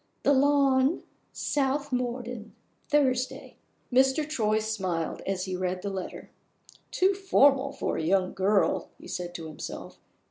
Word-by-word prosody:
The 285 - +4
Lawn, 275 +1 +3 0.3
South 285 0 -1
Morden. 245 -2 -3 0.3
Thursday." 260 -3 0 0.4
Mr. 265 +4 +3
Troy 215 -8 +1
smiled 190 -7 -2
as 190 -1 -1
he 185 -1 -3
read 185 0 -2
the 200 - -2
letter. 190 -2 -6 0.6
"Too 380 +2 +2
formal 280 -8 +3
for 275 - -2
a - - -2
young 185 +2 +1
girl!" 195 +1 +1
he - - -13
said 175 -1 -5
to 165 - -6
himself. 155 -1 -8
245 Hz, 135 wpm, -28 LUFS, 190-275 Hz, 0.6 s, The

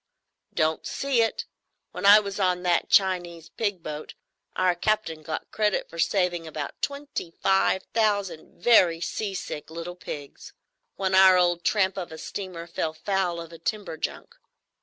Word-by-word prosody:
"Don't 155 0 0
see 270 -4 +1
it. 225 - 0 0.5
When 200 - -1
I 205 +1 +10
was 200 -1 -5
on 180 -2 +1
that 175 -1 +1
Chinese 175 -4 +2
pig 200 -6 -2
boat, 150 0 -7 0.4
our 185 -1 +3
captain 175 -3 -1
got 155 +1 -5
credit 210 -2 0
for 170 - -9
saving 175 -2 +1
about 150 -2 -6
twenty 280 -10 -4
five 190 0 +3
thousand 200 -9 -1
very 180 -8 +5
seasick 190 -4 -4
little 170 +2 -6
pigs, 145 -5 -9 0.4
when 190 -1 -1
our 190 -1 +7
old 175 -1 +2
tramp 195 -2 +1
of 175 - -6
a 160 - -8
steamer 180 -2 -6
fell 160 -2 -3
foul 185 0 -1
of 165 0 -9
a 165 - -11
timber 205 0 -3
junk. - - -5
180 Hz, 155 wpm, -26 LUFS, 165-200 Hz, 0.5 s, I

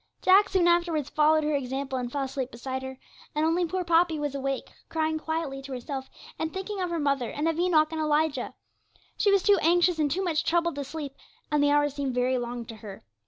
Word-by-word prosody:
Jack 390 +2 +6
soon 365 -3 +3
afterwards 340 -4 +1
followed 310 +1 +4
her 300 0 0
example 265 -1 -2
and 245 -1 -4
fell 280 0 -1
asleep 265 -1 -3
beside 260 +2 -5
her, 265 0 -7 0.4
and 305 +1 +2
only 340 +2 +2
poor 370 +2 -2
Poppy 335 -1 +3
was 290 -2 -2
awake, 275 -1 -3 0.2
crying 315 -1 0
quietly 315 -4 -3
to 270 0 -8
herself, 265 +1 -5 0.3
and 320 0 -2
thinking 385 +2 -4
of 360 - -1
her 340 - -2
mother 280 -5 0
and 300 +3 -2
of 325 0 0
Enoch 320 -3 +3
and 320 -1 -2
Elijah. 305 0 0 0.6
She 405 - +2
was 395 -2 +3
too 405 -1 +5
anxious 345 +1 +3
and 300 -2 +2
too 365 +7 -1
much 325 -3 0
troubled 340 0 +1
to 285 - -2
sleep, 285 0 -6 0.4
and 300 -1 +3
the 290 - +4
hours 290 -1 +3
seemed 275 -3 -3
very 250 +1 +1
long 240 0 -5
to 225 -1 -9
her. 205 -2 -10
300 Hz, 220 wpm, -27 LUFS, 270-335 Hz, 0.6 s, Jack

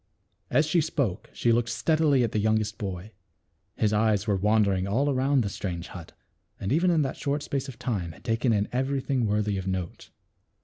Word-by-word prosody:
As 155 - +3
she 160 +2 +2
spoke 135 - -2
she 120 - +1
looked 115 0 +2
steadily 145 +2 +2
at 115 - 0
the 110 - 0
youngest 110 0 0
boy. 95 0 -5 0.6
His 105 -1 +1
eyes 105 -2 +2
were 105 -2 +1
wandering 100 -1 +2
all 135 +8 +1
around 135 0 +2
the - - -2
strange 90 -4 -5
hut, 85 -3 -10 0.5
and 95 - -3
even 175 +4 +3
in 165 -3 +3
that 135 - -3
short 145 +1 -2
space 140 0 -3
of 135 - -9
time 95 -9 -3
had - - -18
taken 115 +2 +1
in 105 -1 +1
every 135 +2 0
thing 130 -3 0
worthy 105 -1 0
of 95 - -6
note. 95 -2 -4
110 Hz, 195 wpm, -27 LUFS, 100-135 Hz, 0.6 s, As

